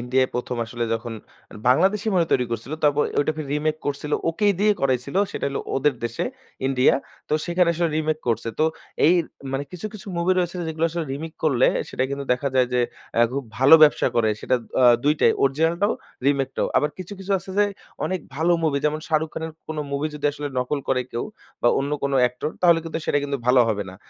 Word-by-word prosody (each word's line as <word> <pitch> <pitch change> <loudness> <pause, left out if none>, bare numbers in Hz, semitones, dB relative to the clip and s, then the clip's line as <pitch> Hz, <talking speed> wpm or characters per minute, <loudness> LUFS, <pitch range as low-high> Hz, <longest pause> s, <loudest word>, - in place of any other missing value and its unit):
ইন্ডিয়ায় 130 +2 +1
১ম 125 0 -3
আসলে 120 +1 -4
যখন 115 +1 -5 0.6
বাংলাদেশই 195 - +3
মনে 180 - +3
হয় 165 - -4
তৈরি 125 -2 +2
করছিল। 115 +4 -4
তারপরে 145 0 +3
ঐটাকে 155 +2 -1
রিমেক 155 +1 0
করছিল। 145 +1 -3 0.2
ওকেই 205 +4 +2
দিয়ে 210 +1 +5
করাইছিল, 130 +2 0 0.2
সেটা - - -2
হলো 140 - -3 0.2
ওদের 140 +1 +2
দেশে, 120 0 -2 0.4
ইন্ডিয়া। 130 -1 +4 0.3
তো - - -4
সেখানে 175 0 +2
আসলে 170 +1 +1
রিমেক 155 0 0
করছে। 115 0 0
তো - - +4 0.4
এইর 170 -1 +4 0.3
মানে 135 +1 -1
কিছু, 180 +3 -5
কিছু 210 - -10
মুভি 170 +2 +2
রয়েছে 180 0 -1
যেগুলা 160 +1 0
আসলে 170 0 -3
রিমেক 160 +3 -6
করলে 130 -5 +4 0.2
সেটা 130 - -1
কিন্তু 140 0 -3
দেখা 135 +3 -1
যায় 130 -1 +4
যে 125 - +3 0.3
অ্যা 115 - +4
খুব 140 0 -3
ভালো 135 +5 +8
ব্যবসা 150 -2 +5
করে। 115 -2 +3
সেটা 130 - +1 0.3
আ - - +6 0.2
২ 150 +1 +4
টাই। - - +5
অরিজিনালটাও, 165 +9 +2 0.3
রিমেকটাও। 135 -2 +1
আবার 150 0 +2
কিছু, 185 +2 -7
কিছু 195 +1 -3
আছে 185 - -11
যে 205 - +6 0.4
অনেক 185 -1 -2
ভালো 165 +4 +2
মুভি। 150 -3 +1
যেমন 150 +1 0
শাহরুখ 160 0 +1
খানের 160 0 -4 0.2
কোন 155 - -4 0.2
মুভি 140 +2 0
যদি 150 -1 -9
আসলে 145 0 -5
নকল 125 +4 -1
করে 130 -1 +2
কেউ 120 - -2 0.4
বা 120 - +5
অন্য 140 +1 -2
কোন 140 0 0
অ্যাক্টর 125 +4 0
তাহলে 170 -2 +6
কিন্তু 165 0 -3
সেটা 145 - +2
কিন্তু 140 0 -2
ভালো 125 0 +6
হবে 105 -2 0
না। - - -11
145 Hz, 205 wpm, -23 LUFS, 130-165 Hz, 0.6 s, ভালো